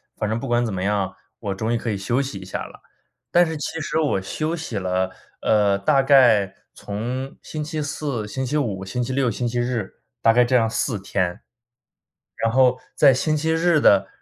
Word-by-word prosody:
反 105 - -2
正 110 +1 -1
不 135 - -5
管 120 0 +2
怎 115 - -2
么 95 -1 -3
样， 100 -2 -1 0.2
我 100 -3 -3
终 110 +4 -1
于 - - +2
可 115 - -4
以 105 - -1
休 120 +7 0
息 135 -7 -5
一 95 - -9
下 95 - -4
了。” - - -15 0.5
但 175 - +6
是 160 -1 -4
其 160 +2 -4
实 155 - -2
我 150 -11 +1
休 155 - -2
息 160 -9 -5
了， 95 0 0 0.3
呃， 105 -2 +3
大 135 +6 +3
概 120 -8 +5 0.2
从 125 +6 -5
星 155 -1 -5
期 155 0 -4
四、 140 -6 -3
星 130 +5 -3
期 145 +4 -1
五、 100 -9 -2
星 125 +6 -2
期 120 - -4
六、 130 -2 +1
星 120 +4 -2
期 120 +1 -1
日， 120 -5 -2 0.3
大 115 - +5
概 125 +1 +5
这 125 +1 +1
样 115 -2 +3
4 110 -1 -1
天， 90 -2 -2 1.0
然 115 - 0
后 130 0 +4 0.2
在 140 -3 +6
星 155 +4 0
期 160 +2 0
日 165 0 +3
的 100 -1 +5
120 Hz, 225 characters per minute, -22 LUFS, 100-140 Hz, 1.0 s, 但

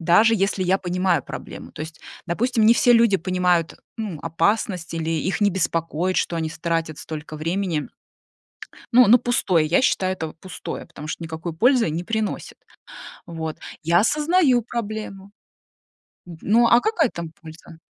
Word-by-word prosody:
даже 180 +7 +4
если 195 -1 0
я 185 +1 +3
понимаю 180 -4 0
проблему. - - -9
То - - -11
есть, 160 0 -10 0.3
допустим, 225 +5 +1
не 230 - +7
все 245 - +4
люди 230 -4 +5
понимают, 180 -2 0 0.2
ну, 210 -8 -5
опасность 170 +1 -1
или 165 -1 -2
их 165 +6 -1
не 205 -1 +4
беспокоит, 170 0 -1
что 170 - 0
они 160 -1 -2
ис 155 - -10
тратят 165 -2 -2
столько 155 0 -7
времени. 165 0 -2 1.1
Ну, 250 -2 +8
на 235 +4 +8
пустое, 205 -9 +1
я 165 +8 +2
считаю, 185 -7 +1
это 160 -4 -6
пустое, 185 - -7
потому 150 - -10
что 165 - -5
никакой 160 +1 -5
пользы 240 - +3
не 165 +3 -3
приносит. 220 +2 -3 0.7
Вот. 160 -2 -5 0.3
Я 170 +2 +4
осознаю 300 - +3
проблему. 215 -4 -6 1.0
Н 175 -2 -10
ну, 230 +3 +4
а 235 +1 +5
какая 360 - +1
там 170 -2 -6
польза? 160 0 -13
180 Hz, 155 wpm, -22 LUFS, 165-220 Hz, 1.1 s, Ну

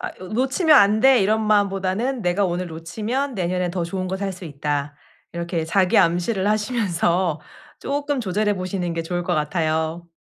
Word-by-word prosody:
'아 - - -3
요 185 - -8
놓치면 275 - +3
안 205 +2 +5
돼.' 265 -2 +6
이런 215 +3 +2
마음 205 -1 +4
보다는 195 +7 -2
'내가 180 +3 +1
오늘 180 0 -2
놓치면 220 - -3
내년엔 180 -1 -1
더 175 -2 -2
좋은 185 +2 -4
거 190 - -2
살 195 0 -3
수 180 0 -10
있다.' 145 -1 -3 0.4
이렇게 170 -1 -3
자기암시를 185 +2 +2
하시면서 190 -7 0 0.4
쪼끔 285 -1 -2
조절해 210 0 0
보시는 185 -2 -3
게 165 - -2
좋을 175 +2 -3
것 175 0 -1
같아요. 160 +2 -1
185 Hz, 345 characters per minute, -22 LUFS, 170-215 Hz, 0.4 s, 돼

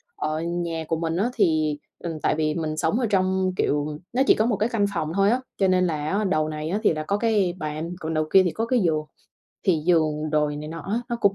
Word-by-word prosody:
ở 155 +1 -2
nhà 170 -1 -2
của 165 - 0
mình 165 0 -1
á 220 +5 +1
thì, 155 - +2 0.2
ừm, 165 -2 -5
tại - - +2
vì 155 -1 0
mình 155 -2 -2
sống 160 +9 +1
ở 245 - +1
trong, 190 -1 +1
kiểu, 150 -2 0 0.2
nó 255 - +2
chỉ - - +7
có 220 - +2
một 230 -2 +1
cái 215 +4 +1
căn 220 -4 +1
phòng 155 0 -1
thôi 195 +2 +3
á, 245 +3 +1 0.2
cho 195 - +3
nên 185 0 +3
là 155 -2 -2
á 215 - +1
đầu 155 -6 +1
này 155 0 -4
á 200 +5 0
thì 205 - +4
là 155 0 -3
có 200 +6 0
cái 205 -5 +1
bàn, 155 +1 -4
còn 160 +1 -3
đầu 155 0 +1
kia 190 - +8
thì 180 - 0
có 225 +8 -2
cái 245 +1 +2
giường. 160 -6 +1 0.6
Thì 175 -5 +3
giường 155 -3 +2
đồ 150 -1 +2
này 145 - -4
này 150 +1 -6
nọ 165 +1 -6
á 210 +7 -2
nó 240 - -1
cũng 200 -4 +2
170 Hz, 270 wpm, -24 LUFS, 155-200 Hz, 0.6 s, kia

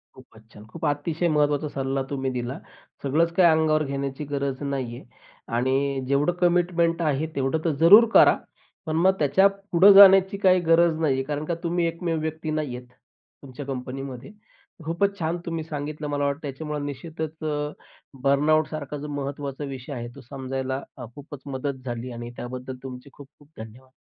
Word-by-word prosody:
खूपच 115 -3 -18
छान! 105 - -13
खूप 160 +8 -7
अतिशय 155 +4 -1
महत्त्वाचा 150 -1 +1
सल्ला 135 0 -2
तुम्ही 135 -2 -2
दिला. 125 +1 -4 0.5
सगळंच 160 +5 +2
काही 175 -1 +5
अंगावर 155 -1 +2
घेण्याची 140 0 -4
गरज 140 -1 -3
नाहीये 130 -4 -4 0.5
आणि 135 +2 0
जेवढं 140 +5 +2
कमिटमेंट 175 -1 +2
आहे 155 -1 0
तेवढं 135 +3 0
तर 165 - +2
जरूर 200 +8 +9
करा, - - +7 0.5
पण 155 - -2
मग 185 +4 +4
त्याच्या 155 +7 +4 0.2
पुढे 185 +4 +7
जाण्याची 195 0 +8
काही 185 -2 +4
गरज 165 -1 +3
नाहीये 135 -4 +1
कारण 150 +2 -4
का 170 - -2
तुम्ही 170 0 0
एकमेव 165 -1 -2
व्यक्ती 160 0 -4
नाहीयेत 125 -5 -4 0.5
तुमच्या 140 +1 -9
कंपनीमध्ये. 130 +3 -6 0.5
खूपच 200 +5 0
छान 165 +1 -1
तुम्ही 165 -1 -3
सांगितलं. 150 0 -5
मला 145 -1 -1
वाटतं 140 +2 -2
त्याच्यामुळे 150 +1 -5
निश्चितच 160 +2 -6
अ, 150 -1 -2 0.5
बर्नआउटसारखा 150 +1 +1
जो 145 +1 -7
महत्त्वाचा 140 0 -5
विषय 135 0 -7
आहे, 120 -2 -5
तो 140 - -11
समजायला 130 +1 -4 0.2
अ, 125 - -7
खूपच 145 -1 -10
मदत 135 -1 -4
झाली 120 +1 -5
आणि 120 0 -7
त्याबद्दल 125 +1 -6
तुमचे 130 +1 -9
खूप-खूप 145 +1 -17
धन्यवाद. 110 +4 -11
145 Hz, 155 wpm, -24 LUFS, 135-160 Hz, 0.5 s, जरूर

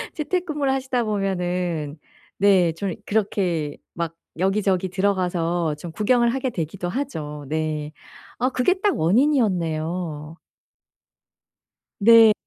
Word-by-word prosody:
재택근무를 305 -4 -1
하시다 260 -2 0
보면은 180 -7 -2 0.4
네 190 -4 +4
좀 185 +1 -3
그렇게 185 -8 0 0.2
막 165 -1 -3 0.2
여기저기 190 -1 +1
들어가서 175 -4 0
좀 165 +3 -8
구경을 235 +6 +2
하게 265 0 -1
되기도 175 -2 -4
하죠. 155 - -4
네. 155 0 -2 0.5
아 250 +2 +2
그게 315 +9 +1
딱 410 -2 +2
원인이었네요. 170 - 0 1.6
네. 225 +1 +8
185 Hz, 230 characters per minute, -23 LUFS, 165-230 Hz, 1.6 s, 네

